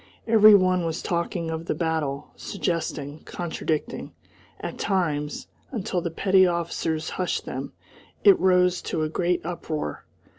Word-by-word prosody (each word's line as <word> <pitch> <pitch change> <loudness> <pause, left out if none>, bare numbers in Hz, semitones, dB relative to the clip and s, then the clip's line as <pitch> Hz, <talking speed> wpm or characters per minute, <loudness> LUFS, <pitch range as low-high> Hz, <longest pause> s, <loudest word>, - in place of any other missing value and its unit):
Every 215 -2 +8
one 185 -2 +3
was 165 +1 -3
talking 170 -1 -2
of 160 +1 -5
the - - 0
battle, 160 -4 -2
suggesting, 160 -6 -3
contradicting 160 -3 -3 0.5
at - - -6
times, 155 -7 -1 0.2
until 190 -7 -2
the 170 - -2
petty 190 +2 +4
officers 165 -2 -2
hushed 180 - -1
them, - - -5 0.5
it 395 -2 +7
rose 180 -1 +3
to 160 - -2
a 155 - -1
great 175 +1 0
uproar. 160 - -4
170 Hz, 135 wpm, -25 LUFS, 160-185 Hz, 0.5 s, Every